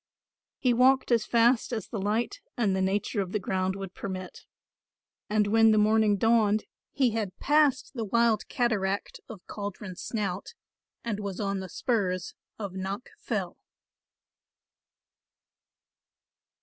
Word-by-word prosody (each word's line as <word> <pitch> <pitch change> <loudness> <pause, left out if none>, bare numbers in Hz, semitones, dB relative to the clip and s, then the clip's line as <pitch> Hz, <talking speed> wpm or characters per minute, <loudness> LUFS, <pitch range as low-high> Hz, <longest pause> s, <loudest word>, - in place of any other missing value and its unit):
He 250 -2 +2
walked 260 +2 +4
as 230 -2 +3
fast 235 +1 +3
as 220 -5 -3
the 215 - -4
light 215 +4 -1 0.2
and 210 -5 +2
the 190 - 0
nature 200 +2 0
of 185 -1 -5
the 210 - +1
ground 190 0 -1
would 195 -2 -7
permit, 185 -2 -7 0.8
and 210 0 +3
when 225 +2 +5
the 215 - +4
morning 215 -1 +4
dawned 220 -1 +3 0.3
he 265 -4 +2
had 215 -4 -3
passed 290 -3 +2
the 235 -4 -3
wild 230 0 +2
cataract 205 -5 -1
of 205 -5 -10
Caldron 200 -2 -6
Snout 205 - -4 0.5
and 215 -3 -2
was 200 -2 -5
on 200 -2 -1
the 190 -1 -6
spurs 190 -8 -1 0.2
of 200 -4 -5
Knock 195 +5 -5
Fell. - - -3
210 Hz, 135 wpm, -28 LUFS, 195-230 Hz, 0.8 s, when